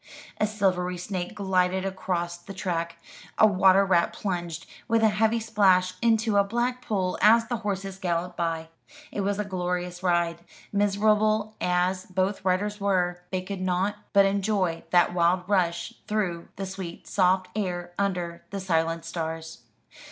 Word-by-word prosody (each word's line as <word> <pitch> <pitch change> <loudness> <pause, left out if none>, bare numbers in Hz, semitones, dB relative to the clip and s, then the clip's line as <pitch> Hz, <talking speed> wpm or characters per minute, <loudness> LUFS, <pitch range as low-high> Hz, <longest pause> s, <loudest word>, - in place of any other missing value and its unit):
A 215 - +2
silvery 185 -4 0
snake 180 +2 -4
glided 190 -1 +1
across 180 -2 -2
the 180 +3 -11
track; 170 -3 -2 0.4
a - - +7
water 190 -1 +5
rat 175 -3 +2
plunged, 175 -4 -4 0.2
with 225 0 +2
a 220 - +6
heavy 220 +2 +2
splash, 195 -5 +3
into 225 -2 +2
a 200 - +6
black 240 +4 -1
pool 190 -5 -1
as 225 +2 +6
the 235 +1 -2
horses 195 -2 -4
galloped 175 0 -2
by. 165 -1 -2 0.4
It 205 - -2
was 200 0 0
a 210 - -1
glorious 180 -1 -3
ride. 170 -2 +1 0.3
Miserable 210 +1 +2
as 180 +1 +1
both 190 +2 -1
riders 200 +3 0
were, 180 -3 +1
they 185 -1 -2
could 195 0 -5
not 185 +2 0 0.2
but 200 -1 +6
enjoy 195 -3 0
that 175 0 +4
wild 180 +1 +2
rush 180 +1 0
through 185 -6 -1
the 195 - -4
sweet 190 -2 -7
soft 185 -1 +2
air, 175 -4 -3
under 180 -4 -2
the 200 - -4
silent 165 -3 0
stars. 165 -1 -5
185 Hz, 150 wpm, -26 LUFS, 175-205 Hz, 0.4 s, a